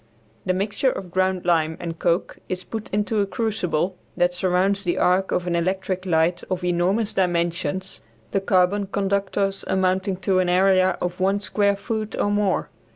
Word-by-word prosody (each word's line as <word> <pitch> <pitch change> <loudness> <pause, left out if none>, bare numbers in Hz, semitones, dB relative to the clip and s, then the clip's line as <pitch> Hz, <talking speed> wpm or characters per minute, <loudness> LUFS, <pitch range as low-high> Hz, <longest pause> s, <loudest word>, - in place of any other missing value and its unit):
The 185 - +3
mixture 205 +7 0
of 180 -7 -7
ground 185 0 0
lime 160 -2 +2
and 165 -2 -5
coke 170 +1 0
is 185 0 -3
put 220 +2 -6
into 210 +1 0
a 200 - +1
crucible 185 -6 -1 0.2
that 175 0 +2
surrounds 190 +2 +1
the 175 -3 0
arc 185 +2 +2
of 180 - 0
an 175 -1 0
electric 185 +2 -1
light 170 +1 +2
of 185 -1 -2
enormous 180 +5 +1
dimensions; 175 0 -1 0.3
the 195 - +1
carbon 195 +1 +2
conductors 195 0 -1
amounting 190 +1 +1
to 190 -2 +2
an 180 -1 +1
area 185 0 +4
of 180 0 -3
one 195 +2 +2
square 200 0 +1
foot 215 +1 -4
or 205 - +1
more. 205 -2 0
185 Hz, 165 wpm, -23 LUFS, 180-200 Hz, 0.3 s, area